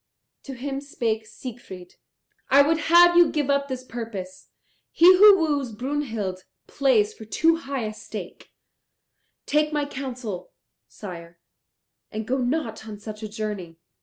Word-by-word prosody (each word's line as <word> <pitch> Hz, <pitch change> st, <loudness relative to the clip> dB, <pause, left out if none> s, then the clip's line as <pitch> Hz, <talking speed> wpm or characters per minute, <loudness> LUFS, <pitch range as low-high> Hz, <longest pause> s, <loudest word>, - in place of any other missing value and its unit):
To 275 Hz, -, -7 dB
him 270 Hz, +2 st, -4 dB
spake 225 Hz, -6 st, -3 dB
Siegfried, 205 Hz, -9 st, -10 dB, 0.6 s
"I 280 Hz, +1 st, +7 dB
would 320 Hz, +3 st, +1 dB
have 345 Hz, +1 st, +7 dB
you 345 Hz, -2 st, +6 dB
give 290 Hz, -2 st, 0 dB
up 280 Hz, 0 st, +1 dB
this 260 Hz, -2 st, -5 dB
purpose. 220 Hz, -7 st, -8 dB, 0.4 s
He 335 Hz, -, +3 dB
who 410 Hz, 0 st, +8 dB
woos 290 Hz, -7 st, -1 dB
Brunhild 225 Hz, -7 st, -4 dB, 0.2 s
plays 245 Hz, -7 st, +2 dB
for -, -, -12 dB
too 325 Hz, +10 st, +2 dB
high 275 Hz, -5 st, -4 dB
a 215 Hz, 0 st, -4 dB
stake. -, -, -9 dB, 0.9 s
Take 300 Hz, +1 st, +1 dB
my 295 Hz, -1 st, 0 dB
counsel, 250 Hz, -9 st, -6 dB, 0.3 s
sire, 170 Hz, -4 st, -10 dB, 0.7 s
and 215 Hz, 0 st, -5 dB
go 265 Hz, +2 st, 0 dB
not 245 Hz, -4 st, -2 dB
on 210 Hz, -1 st, -7 dB
such 215 Hz, +1 st, -9 dB
a 215 Hz, -, -5 dB
journey." 205 Hz, -6 st, -5 dB
250 Hz, 140 wpm, -24 LUFS, 215-285 Hz, 0.9 s, who